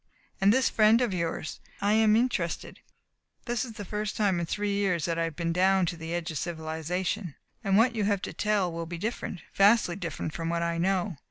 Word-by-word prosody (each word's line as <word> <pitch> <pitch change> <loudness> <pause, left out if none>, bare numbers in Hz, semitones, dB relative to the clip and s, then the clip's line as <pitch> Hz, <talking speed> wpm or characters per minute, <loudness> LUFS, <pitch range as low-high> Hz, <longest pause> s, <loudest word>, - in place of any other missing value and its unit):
And 195 +1 +6
this 260 +3 +3
friend 220 +1 +5
of 245 -6 0
yours? 165 -3 -3 0.2
I 205 +1 +2
am 215 -1 +5
interested. 220 -8 -1 0.7
This 240 -2 -1
is 240 -3 -7
the 210 -2 -7
first 210 +1 -3
time 195 -5 +2
in 170 - -2
three 205 +3 -1
years 185 -6 +1
that 165 -1 -1
I 165 - +2
have 165 -2 -5
been 170 0 -1
down 190 +1 +3
to 170 - -2
the 165 0 -7
edge 170 0 -3
of 155 - -3
civilization, 170 +2 -3 0.3
and 195 -2 +3
what 230 +2 +4
you 215 -3 0
have 200 -2 0
to - - -4
tell 205 -4 +1
will 165 0 -5
be 170 +1 -5
different 195 -3 -4
vastly 200 -3 +4
different 170 -4 -4
from 165 0 -3
what 170 0 0
I 170 0 -1
know. 185 -1 0
190 Hz, 220 wpm, -28 LUFS, 170-210 Hz, 0.7 s, And